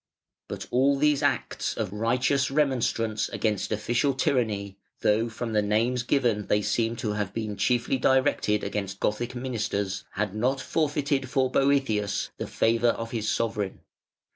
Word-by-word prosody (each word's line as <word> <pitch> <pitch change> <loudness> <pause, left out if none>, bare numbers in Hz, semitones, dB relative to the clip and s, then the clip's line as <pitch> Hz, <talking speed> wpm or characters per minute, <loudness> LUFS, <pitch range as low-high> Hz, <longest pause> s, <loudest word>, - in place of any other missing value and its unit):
But - - -6
all 135 +3 +4
these 150 0 +3
acts 140 -3 -1
of 105 -4 -2
righteous 125 +5 +1
remonstrance 125 -6 0
against 105 -3 -1
official 120 +6 +1
tyranny, 105 -7 0 0.2
though 110 +3 +2
from 115 0 -5
the 105 - +3
names 115 +4 +1
given 120 -5 +1
they 105 0 +2
seem 115 +2 0
to 110 -2 -2
have 105 -2 -3
been 110 -2 -3
chiefly 120 +5 +1
directed 130 -6 +2
against 100 -2 -3
Gothic 120 +4 -1
ministers, 105 -6 -2
had 105 -1 -2
not 125 +6 0
forfeited 145 -3 0
for 130 0 +1
Boëthius 130 -8 +1
the - - -3
favour 115 +1 +2
of 115 0 -3
his 110 -2 -2
sovereign. 105 -4 -2
115 Hz, 145 wpm, -26 LUFS, 105-130 Hz, 0.2 s, all